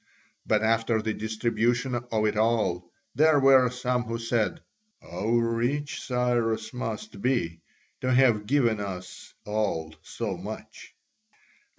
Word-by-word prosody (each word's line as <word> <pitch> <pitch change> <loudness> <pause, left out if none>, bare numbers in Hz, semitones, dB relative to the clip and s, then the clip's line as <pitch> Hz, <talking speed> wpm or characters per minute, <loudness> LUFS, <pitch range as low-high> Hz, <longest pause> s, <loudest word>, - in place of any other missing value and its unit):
But 110 0 +2
after 115 0 +2
the 110 0 -2
distribution 115 +3 0
of 120 -3 -1
it 105 0 +1
all 105 -6 +1 0.2
there 155 0 +4
were 135 -2 +6
some 125 0 -1
who 115 -1 -4
said: 115 +6 -1 0.4
"How 90 +6 -6
rich 120 +5 0
Cyrus 120 -3 0
must 110 -4 -5
be, 85 -11 0 0.4
to 130 - -1
have 120 -5 +4
given 120 -5 +2
us 90 -3 -7
all 105 -7 -2
so - - -4
much!" - - -9
115 Hz, 120 wpm, -27 LUFS, 110-125 Hz, 0.4 s, were